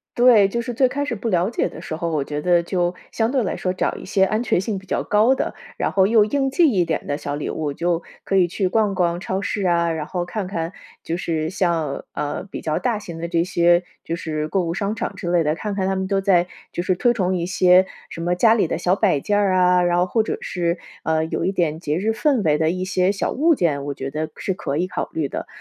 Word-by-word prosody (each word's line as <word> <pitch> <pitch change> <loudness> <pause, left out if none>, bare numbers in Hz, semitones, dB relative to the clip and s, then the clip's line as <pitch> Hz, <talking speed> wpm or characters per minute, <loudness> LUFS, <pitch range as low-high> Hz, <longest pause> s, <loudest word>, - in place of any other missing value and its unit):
对。 240 -5 +6
就 235 +3 -1
是 240 +1 -5
最 260 +2 +3
开 285 +3 -2
始 250 - -2
不 230 +2 -3
了 180 0 +2
解 - - 0
的 - - -10
时 160 - -5
候， 170 +1 -2
我 150 -3 0
觉 150 +1 -4
得 175 +1 +3
就 175 0 -1 0.2
相 225 +1 0
对 260 -3 +1
来 190 - -2
说 185 - -2
找 185 - -1
一 - - -9
些 190 -1 +2
安 215 +3 +1
全 240 - +1
性 195 +1 -2
比 190 - -19
较 - - -1
高 220 +6 +3
的， - - -2 0.2
然 - - 0
后 190 -1 +4
又 215 -1 +5
应 270 +4 0
季 305 +1 +4
一 185 -4 +2
点 160 - -2
的 145 - -2
小 145 - -4
礼 150 - -4
物。 150 -2 -2
就 170 +3 -1 0.2
可 195 - -1
以 180 -2 +5
去 185 +2 -1
逛 205 0 +1
逛 175 -1 +1
超 190 +1 -3
市 200 -1 -2
啊， 170 -1 +2
然 155 -2 -3
后 180 -2 -2
看 190 +1 -4
看 170 -1 -3 0.3
就 165 - -2
是 160 -3 -2
像， 170 -7 -1
呃， 145 -1 -3
比 - - -7
较 155 -1 -1
大 240 -4 0
型 170 -5 -8
的 170 - -3
这 170 -1 +1
些 175 -1 +3 0.2
就 165 - -3
是 155 -2 -3
购 190 +4 0
物 165 0 -2
商 205 +2 -2
场 230 - -3
之 175 - -4
类 175 -2 +3
的， 150 0 +1
看 205 +3 -4
看 190 -2 -1
它 195 - 0
们 190 0 -2
都 195 0 +1
在 180 -3 +3 0.3
就 - - -1
是 185 +1 +1
推 240 +5 +2
崇 185 -5 0
一 170 - -2
些 185 0 +5 0.2
什 165 - -7
么 175 +1 +1
家 220 +4 +5
里 210 - +2
的 - - -2
小 180 +2 +2
摆 190 -9 +2
件 205 +8 0
儿 200 -2 +2
啊， 180 -1 +4
然 175 0 +2
后 180 - +3
或 220 +3 +1
者 - - -3
是， 170 -1 -2 0.2
呃， 160 0 +1
有 160 - -2
一 190 - +1
点 165 -5 0
节 150 -3 -2
日 210 +4 0
氛 260 +2 +2
围 150 -3 +3
的 160 +1 +2
一 185 +1 -3
些 185 0 +1
小 200 - -2
物 325 +4 +3
件， 145 - 0
我 145 - -3
觉 135 0 -5
得 155 +2 -3
是 190 - -2
可 140 -6 -4
以 180 +3 0
考 - - -3
虑 155 -3 -1
的。 - - -5
180 Hz, 290 characters per minute, -22 LUFS, 165-205 Hz, 0.3 s, 对